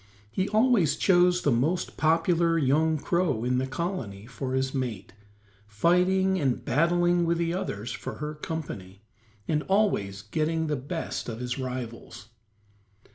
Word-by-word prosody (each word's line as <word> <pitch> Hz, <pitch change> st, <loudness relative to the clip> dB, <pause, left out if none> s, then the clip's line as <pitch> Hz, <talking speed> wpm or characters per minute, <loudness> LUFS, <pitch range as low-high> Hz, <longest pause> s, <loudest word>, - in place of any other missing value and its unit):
He 190 Hz, -, -1 dB
always 215 Hz, -, +3 dB
chose 180 Hz, -1 st, +3 dB
the 145 Hz, -, +3 dB
most 155 Hz, +10 st, 0 dB
popular 165 Hz, +1 st, +2 dB
young 155 Hz, +2 st, +2 dB
crow 165 Hz, -7 st, 0 dB
in 125 Hz, +1 st, +1 dB
the 130 Hz, -, -1 dB
colony 130 Hz, -, -4 dB
for 130 Hz, +1 st, -4 dB
his 130 Hz, 0 st, 0 dB
mate, 120 Hz, -8 st, -4 dB, 0.5 s
fighting 180 Hz, -, +2 dB
and 135 Hz, -5 st, -1 dB
battling 175 Hz, +3 st, +2 dB
with 170 Hz, 0 st, +1 dB
the 170 Hz, 0 st, 0 dB
others 120 Hz, -, -4 dB
for 125 Hz, -, -6 dB
her 150 Hz, +1 st, -5 dB
company, 110 Hz, -, -6 dB, 0.4 s
and 150 Hz, -1 st, +1 dB
always 110 Hz, -, +1 dB
getting 160 Hz, +8 st, -1 dB
the 150 Hz, -1 st, 0 dB
best 145 Hz, +1 st, -4 dB
of 115 Hz, 0 st, -5 dB
his 125 Hz, +1 st, -3 dB
rivals. 120 Hz, -5 st, -6 dB
155 Hz, 140 wpm, -27 LUFS, 125-175 Hz, 0.5 s, always